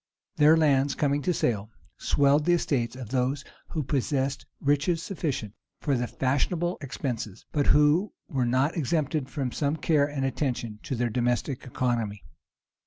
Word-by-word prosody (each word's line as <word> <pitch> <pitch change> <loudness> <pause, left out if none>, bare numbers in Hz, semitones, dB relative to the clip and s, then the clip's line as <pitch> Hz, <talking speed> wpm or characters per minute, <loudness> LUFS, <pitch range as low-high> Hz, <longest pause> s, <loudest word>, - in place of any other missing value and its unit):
Their 150 +2 +6
lands, 140 -3 +3
coming 145 0 +1
to 180 - +1
sale, 110 - 0 0.3
swelled 145 +1 +3
the 175 - +4
estates 125 -8 -1
of 125 -4 -7
those 130 +2 0 0.2
who 155 -3 -3
possessed 135 0 -1 0.2
itches 145 +4 +2
sufficient 145 - -3 0.3
for 140 -3 0
the 120 -1 -1
fashionable 160 +9 0
expenses, 120 -6 -4
but 145 -2 +1
who 150 +7 +4 0.2
were 130 -7 0
not 130 +5 +2
exempted 150 -2 0
from 135 -3 -2
some 145 +3 0
care 150 -3 +2
and 140 -2 -2
attention 125 -5 -2
to 130 - -3
their 120 -1 0
domestic 125 +3 -1
economy. 115 -5 -1
140 Hz, 150 wpm, -27 LUFS, 125-150 Hz, 0.3 s, Their